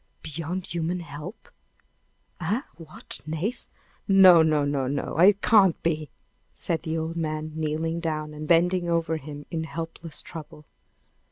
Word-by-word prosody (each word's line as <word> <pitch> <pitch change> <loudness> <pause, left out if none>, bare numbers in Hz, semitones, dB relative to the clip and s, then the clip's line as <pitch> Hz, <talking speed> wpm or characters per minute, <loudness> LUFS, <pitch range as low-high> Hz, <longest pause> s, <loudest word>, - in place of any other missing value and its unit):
"Beyond 165 +4 -4
human 175 +1 -2
help! 150 - -9 0.9
Eh! 200 - -1
what? 160 -2 -7
Nace! 165 +10 -3 0.4
No! 190 -4 +8
no! 155 -2 +3
no! 140 -2 0
no! 140 +1 -3
It 195 +3 +6
can't 200 -7 +5
be!" 155 -3 -1 0.5
said 165 -2 -2
the 160 -1 -3
old 160 +1 -3
man, 155 -1 -3
kneeling 160 +1 -2
down, 155 -2 -3
and 150 0 -7
bending 175 +1 +3
over 165 -1 +1
him 145 -1 -9
in 165 -2 -2
helpless 165 0 -5
trouble. 150 -2 -10
160 Hz, 140 wpm, -26 LUFS, 155-175 Hz, 0.9 s, No